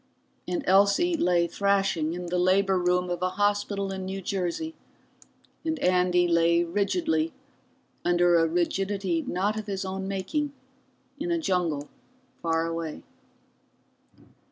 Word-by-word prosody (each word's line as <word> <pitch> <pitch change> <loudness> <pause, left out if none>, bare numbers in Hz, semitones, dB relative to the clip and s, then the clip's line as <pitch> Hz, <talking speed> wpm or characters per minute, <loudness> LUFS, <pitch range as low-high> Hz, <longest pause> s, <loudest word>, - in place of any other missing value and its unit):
And 335 -4 -2
Elsie 200 - +4
lay 175 - +2
thrashing 195 -4 +1
in 180 0 -5
the 180 +1 -1
labor 190 +1 +3
room 180 0 +1
of 175 0 -3
a 185 - +1
hospital 205 -1 0
in 190 -1 -4
New 190 +1 -4
Jersey, 195 - -3 0.9
and 320 0 -1
Andy 180 -4 +3
lay 170 0 +3
rigidly 315 - 0 0.7
under 175 -1 +4
a 165 - +3
rigidity 180 +1 0
not 205 +6 -1
of 215 - -8
his 195 -1 -3
own 190 0 -4
making 200 +10 -2 0.7
in 330 +3 -3
a 340 - +1
jungle 175 - -1 0.5
far 165 0 +1
away. 165 -2 -4
190 Hz, 130 wpm, -27 LUFS, 175-200 Hz, 0.9 s, Elsie